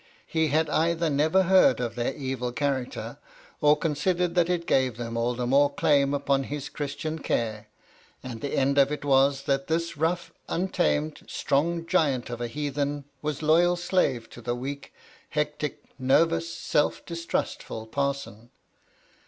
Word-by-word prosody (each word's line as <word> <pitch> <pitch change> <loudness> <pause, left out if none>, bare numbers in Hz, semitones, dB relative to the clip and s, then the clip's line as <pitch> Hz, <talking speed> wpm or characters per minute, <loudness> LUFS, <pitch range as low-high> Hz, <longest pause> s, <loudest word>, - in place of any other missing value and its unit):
He 160 -1 +1
had 155 +2 +2
either 165 +1 +1
never 155 +7 +3
heard 185 -9 +5
of 120 -2 -2
their 120 +2 -2
evil 130 -3 -3
character, 135 -1 -3 0.4
or 150 0 +5
considered 170 +3 0
that 175 -1 +2
it 175 -1 0
gave 130 -6 +2
them 115 -1 -5
all 120 +1 0
the 125 0 -2
more 140 +3 +4
claims 140 -1 +2
upon 140 -1 +1
his 145 0 -5
Christian 155 +2 -4
care, 110 -6 -2 0.6
and 120 -3 -7
the 140 - -2
end 140 +1 +3
of 140 +1 +4
it 150 -1 -4
was 135 0 +3
that 135 0 0
this 170 0 -1
rough, 165 +2 -1 0.2
untamed, 75 - 0
strong 165 +4 0
giant 140 -9 +1
of 120 0 -5
a 120 - -1
heathen 145 +1 -2 0.2
was 150 0 -3
loyal 170 +3 +4
slave 175 -10 0
to 120 - -11
the 120 +1 -2
weak, 140 +3 -6 0.4
hectic, - - -2 0.2
nervous, 165 +5 +2
self 150 - 0
distrustful 170 -9 -3
parson. 135 -2 -3
140 Hz, 155 wpm, -26 LUFS, 130-160 Hz, 0.6 s, heard